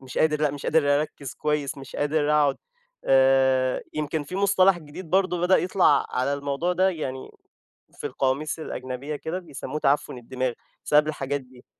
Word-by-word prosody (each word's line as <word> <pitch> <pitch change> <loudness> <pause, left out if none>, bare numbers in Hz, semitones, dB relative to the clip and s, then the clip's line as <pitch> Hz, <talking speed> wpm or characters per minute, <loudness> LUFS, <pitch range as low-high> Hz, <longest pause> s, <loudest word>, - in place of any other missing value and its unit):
مش 130 -1 -6
قادر، 155 -1 +2
لأ 150 -1 +2
مش 140 0 -7
قادر 145 -2 +3
أركز 145 -3 -6
كويس، 150 -1 -2
مش 135 - -10
قادر 145 0 +1
أقعد. 145 -2 +3 0.5
آآ، 130 -1 +3
يمكن 155 0 -2
في 180 +6 -6
مصطلح 195 -2 +4
جديد 155 +2 -10
برضه 185 -2 +2
بدأ 180 +2 +4
يطلع 180 -6 +3
على 130 +3 0
الموضوع 140 +5 -1
ده 185 +1 +3
يعني، 135 -7 -5 0.6
في 145 - -5
القواميس 140 +4 -1
الأجنبية 130 0 -5
كده 160 +5 -4
بيسموه 155 -3 -6
تعفّن 145 -2 +1
الدماغ 130 +1 -3 0.3
بسبب 150 0 +4
الحاجات 145 -2 -2
دي. 125 -1 -18
145 Hz, 165 wpm, -25 LUFS, 135-160 Hz, 0.6 s, مصطلح